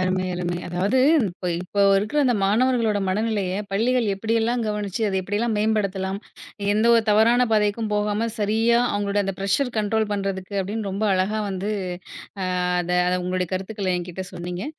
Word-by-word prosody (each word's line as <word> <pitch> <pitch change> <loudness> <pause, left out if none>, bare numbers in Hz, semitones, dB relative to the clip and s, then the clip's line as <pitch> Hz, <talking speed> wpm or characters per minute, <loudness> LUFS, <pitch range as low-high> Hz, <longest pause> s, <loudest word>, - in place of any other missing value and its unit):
அருமை, 185 0 0
அருமை. 175 0 -2
அதாவது 190 +8 0 0.3
இப்ப 180 +1 -5
இப்ப 200 +2 -2 0.2
இருக்குற 215 +9 -1
அந்த 245 - +3
மாணவர்களோட 225 0 +2
மனநிலையை, 200 -2 -1
பள்ளிகள் 235 +4 +1
எப்படியெல்லாம் 225 +3 0
கவனிச்சு 210 0 -3
அத 190 - -1
எப்படியெல்லாம் 210 +4 -1
மேம்படுத்தலாம்? 195 -3 0 0.6
எந்தவொரு 230 +1 +4
தவறான 230 +4 +4
பாதைக்கும் 210 +1 +1
போகாம, 210 +2 0
சரியா 225 +3 +2
அவங்களோட 205 0 0
அந்த 195 - -3
பிரஷர் 235 +6 0
கன்ட்ரோல் 215 0 0
பண்றதுக்கு 195 -1 -3
அப்படின்னு 205 +1 -4
ரொம்ப 200 +3 -1
அழகா 195 +4 0
வந்து, 195 +2 -3 0.7
ஆ - - -1 0.4
அத 175 +1 -3 0.3
உங்களுடைய 180 -1 -1
கருத்துக்களை 190 0 -2
என்கிட்ட 180 +1 -6
சொன்னீங்க. 175 +1 -5
205 Hz, 140 wpm, -23 LUFS, 190-220 Hz, 0.7 s, எந்தவொரு